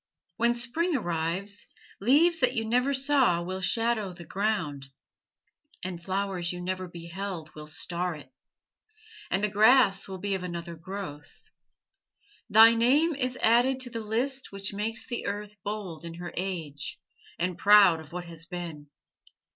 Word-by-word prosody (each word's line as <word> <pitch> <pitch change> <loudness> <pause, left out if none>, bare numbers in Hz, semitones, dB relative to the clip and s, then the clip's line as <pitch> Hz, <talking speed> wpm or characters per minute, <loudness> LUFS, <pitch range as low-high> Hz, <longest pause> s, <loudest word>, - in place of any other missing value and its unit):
When 235 +1 +3
Spring 300 +8 0
arrives, 180 0 -2 0.3
leaves 310 - +4
that 255 0 +3
you 225 -2 0
never 250 +4 +2
saw 265 - +3
will 185 +2 -4
shadow 225 -2 +1
the 170 -1 -11
ground, 185 -10 -2 1.0
and 180 -2 -5
flowers 190 -1 -2
you 180 - -6
never 185 +1 -3
beheld 170 -1 -6
will 150 0 -9
star 175 +2 -1
it, 140 -4 -13 1.0
and 195 - 0
the - - +4
grass 215 -1 +5
will 190 -1 -6
be 200 +2 -2
of 190 - -2
another 170 -1 -5
growth. 165 -3 -9 1.0
Thy 225 +2 +8
name 275 +9 +3
is 255 -2 -1
added 245 +4 +4
to 245 -1 -7
the 230 - -4
list 250 +5 -1
which 200 +1 -4
makes 220 +3 -2
the 240 -2 -4
earth 205 +1 -4
bold 200 -6 -5
in 165 0 -7
her 175 0 -7
age, 165 -7 -4 0.4
and 180 +1 -1
proud 200 -3 +6
of 155 -1 -12
what 175 0 -5
has 165 -1 -7
been. 170 -5 -6
195 Hz, 150 wpm, -28 LUFS, 175-230 Hz, 1.0 s, Thy